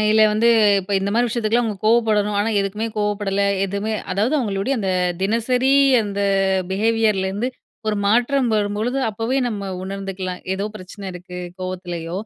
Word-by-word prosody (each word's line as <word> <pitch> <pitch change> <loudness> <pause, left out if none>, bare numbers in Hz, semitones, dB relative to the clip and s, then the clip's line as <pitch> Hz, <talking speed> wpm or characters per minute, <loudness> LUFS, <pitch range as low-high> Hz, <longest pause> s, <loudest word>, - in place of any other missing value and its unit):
இல்ல 220 0 +4
வந்து, 220 +2 +3 0.3
இப்ப 195 +2 -6
இந்த 195 +1 -1
மாரி 240 +1 +3
விஷயத்துக்கலாம், 235 +1 +1
அவங்க 215 -2 -3
கோவப்படணும். 215 -2 +2
ஆனா, 215 +2 0
எதுக்குமே 205 +3 -2
கோவப்படல 205 -1 0 0.2
எதுவுமே 200 +3 -2 0.2
அதாவது, 215 +9 +1
அவங்களுடைய 215 +1 -1
அந்த 195 -3 -1 0.3
தினசரி 245 +6 +1 0.3
அந்த 200 -1 -3 0.5
பிஹேவியர்லேருந்து 210 +1 +1 0.4
ஒரு 210 - 0
மாற்றம் 245 +4 +2
வரும்பொழுது, 210 +5 -1
அப்போவே 225 +5 -1
நம்ம 200 -4 -4
உணர்ந்துக்கலாம். 190 -1 -5
ஏதோ 200 +2 -2
பிரச்சனை 195 +1 -10
இருக்கு, 180 0 -9 0.2
கோவத்துலியோ 175 -2 -5
210 Hz, 135 wpm, -21 LUFS, 195-225 Hz, 0.5 s, இல்ல